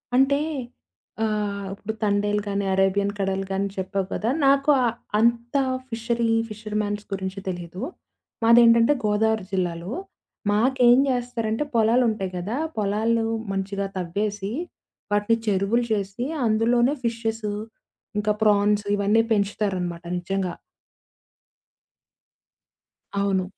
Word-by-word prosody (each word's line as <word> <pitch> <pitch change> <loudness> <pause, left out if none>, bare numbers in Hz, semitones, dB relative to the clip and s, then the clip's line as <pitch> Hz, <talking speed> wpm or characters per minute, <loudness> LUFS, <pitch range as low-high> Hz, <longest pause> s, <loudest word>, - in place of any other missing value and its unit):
అంటే, 270 +2 +4 0.8
ఆహ్ 205 -2 -1
ఇప్పుడు 205 +2 -5
'తండేల్' 205 0 +1
గాని, 200 0 -1
'అరేబియన్ 195 +1 +2
కడల్' 195 0 0
గాని, 195 +1 0
చెప్పావు 190 +1 -1
కదా! 220 - -1 0.2
నాకు 275 +1 +4
ఆ - - +3 0.3
అంత 235 +2 +1 0.3
ఫిషరీ, 230 0 -1 0.2
ఫిషర్ 215 0 -7
మ్యాన్స్ 205 0 -3
గురించి 190 0 -4
తెలీదు. 175 +1 -5 0.6
మాదేంటంటే 230 +2 +6
గోదావరి 215 -1 +1
జిల్లాలు. 175 0 -2 0.6
మాకేం 245 +3 +4
చేస్తారంటే, 245 -1 -1
పొలాలు 230 +3 +4
ఉంటాయి 195 -4 -3
గదా! 200 +8 -3 0.2
పొలాలూ 220 +2 +1 0.3
మంచిగా 195 +1 -2
తవ్వేసి, 200 +3 -2 0.6
వాటిని 205 +2 +2
చెరువులు 205 +4 +2
చేసి, 200 +3 -2 0.2
అందులోనే 240 +5 +3
ఫిషెసు, 225 -2 -2 0.7
ఇంకా 210 0 +1
ఫ్రాన్స్ 205 0 +3
ఇవన్నీ 205 +3 +3
పెంచుతారనమాట! 195 -4 -1 0.2
నిజంగా. 185 0 -2 2.7
అవును. 195 -2 +1
210 Hz, 100 wpm, -24 LUFS, 195-230 Hz, 2.7 s, మాదేంటంటే